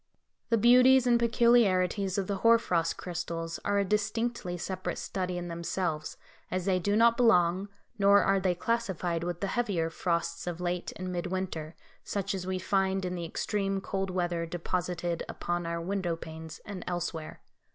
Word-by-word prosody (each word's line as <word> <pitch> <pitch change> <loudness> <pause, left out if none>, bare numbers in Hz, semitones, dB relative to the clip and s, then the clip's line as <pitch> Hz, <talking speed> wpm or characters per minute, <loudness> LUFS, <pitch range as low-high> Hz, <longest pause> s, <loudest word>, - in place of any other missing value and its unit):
The 230 - +3
beauties 250 +3 +6
and 240 -1 +4
peculiarities 205 -5 +3
of 195 - 0
the 200 +1 -2
hoar 230 +3 +6
frost 170 -7 0
crystals 170 -2 -4
are 205 - +1
a 200 - +2
distinctly 210 -1 -1
separate 185 +2 -4
study 185 -2 -3
in 175 0 -4
themselves, 170 -1 -3 0.3
as 185 -1 -2
they 185 -2 +2
do 205 +3 0
not 230 +1 +5
belong, 190 -4 +3 0.3
nor 200 0 +6
are 195 0 +3
they 185 -1 +1
classified 180 -6 -1
with 175 0 -4
the - - 0
heavier 195 -7 -1
frosts 170 0 -2
of 175 -1 -3
late 180 0 -2
and 185 0 -5
mid 175 0 -2
winter, 175 -4 -4 0.3
such 200 0 -2
as 185 -1 -4
we 185 0 -1
find 190 0 0
in 180 - -2
the 175 -1 -4
extreme 195 +3 -1
cold 195 0 -3
weather 175 -2 -1
deposited 175 0 -2
upon 175 0 -3
our 170 0 -2
window 180 -1 -1
panes 160 -1 -9
and 195 -3 -6
elsewhere. 175 -3 -4
185 Hz, 170 wpm, -29 LUFS, 175-200 Hz, 0.3 s, beauties